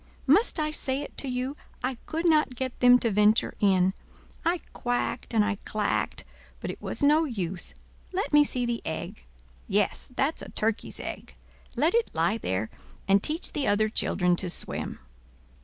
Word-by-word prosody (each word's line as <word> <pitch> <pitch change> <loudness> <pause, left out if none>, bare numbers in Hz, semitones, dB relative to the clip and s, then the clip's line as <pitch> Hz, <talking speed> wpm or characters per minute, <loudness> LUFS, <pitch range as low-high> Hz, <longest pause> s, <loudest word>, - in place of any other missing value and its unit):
Must 330 - +4
I 305 0 0
say 275 -2 -1
it - - -10
to 275 - -2
you, 255 +2 -2 0.3
I 255 -2 -2
could 325 +2 0
not 305 -5 +3
get 260 0 -4
them 250 0 +8
to 230 - +3
venture 210 +2 +3
in. 190 -2 +3 0.5
I 335 +1 +1
quacked 245 0 -2
and 220 -3 +3
I 210 -1 -1
clacked, 215 -1 -1 0.4
but - - -4
it - - -11
was - - -4
no 305 +3 +5
use. 190 - -4 0.4
Let 380 -3 -2
me 295 0 +8
see 250 -3 -1
the 235 -1 -2
egg. 155 - -5 0.4
Yes, 205 0 0
that's 280 +5 0
a - - -8
turkey's 220 0 -2
egg. - - -7 0.4
Let 320 +3 +2
it 465 0 +2
lie 175 +8 +1
there, 95 - -2 0.4
and 195 +1 +5
teach 315 - -2
the 285 - -1
other 215 +1 +3
children 180 -4 +2
to 180 - -3
swim." - - -2
245 Hz, 175 wpm, -27 LUFS, 205-295 Hz, 0.5 s, them